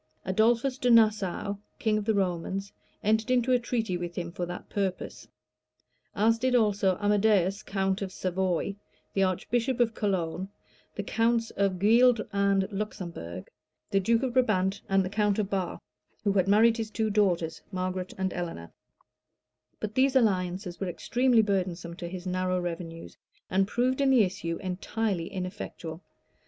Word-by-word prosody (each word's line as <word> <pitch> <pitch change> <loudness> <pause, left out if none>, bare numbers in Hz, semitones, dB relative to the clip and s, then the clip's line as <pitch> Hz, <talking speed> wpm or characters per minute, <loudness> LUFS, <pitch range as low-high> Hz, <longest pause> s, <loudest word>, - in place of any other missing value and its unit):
Adolphus 235 +6 +2
de 250 - +1
Nassau, 215 -3 +3 0.2
king 220 -2 +1
of 215 -1 -1
the 220 -1 +2
Romans, 190 +1 -2 0.3
entered 220 +3 +2
into 255 0 +2
a 250 - +4
treaty 225 -6 -1
with 175 -1 -5
him 170 -1 -4
for 175 0 -4
that 175 - -7
purpose;[*] 195 -2 -3 0.9
as 225 +2 +3
did 255 +1 +1
also 200 -5 +2
Amadæus, 205 -2 +2
count 195 0 -1
of 195 -1 -3
Savoy, 185 +1 -1 0.4
the 195 - +1
archbishop 230 +7 0
of 235 -2 +3
Cologne, 190 -3 -2 0.5
the 205 - -3
counts 230 +2 +1
of 195 -2 0
Gueldre 230 +3 +4
and 200 -1 +2
Luxembourg; 180 - -6 0.4
the 195 - +3
duke 230 +5 +2
of 255 -2 -1
Brabant 200 -6 +2
and 195 -1 +2
count 210 -1 +1
of 210 -2 -1
Barre, 190 -3 -1 0.5
who 205 - +2
had 190 -2 +2
married 225 +3 +5
his 225 -1 -3
two 220 -1 -1
daughters, 180 -6 +1
Margaret 185 -1 -3
and 190 -1 -1
Eleanor: 165 - -5 1.1
but 215 0 -4
these 265 +2 +3
alliances 185 -5 +1
were 195 - -2
extremely 240 +6 +2
burdensome 180 -4 -2
to 175 - -5
his 180 +1 -7
narrow 185 0 0
revenues, 165 -1 -6 0.3
and 195 +1 +2
proved 255 +5 0
in 275 - +3
the 255 -4 +6
issue 170 -3 -3
entirely 185 0 -2
ineffectual. 180 -3 -6
195 Hz, 150 wpm, -28 LUFS, 185-225 Hz, 1.1 s, the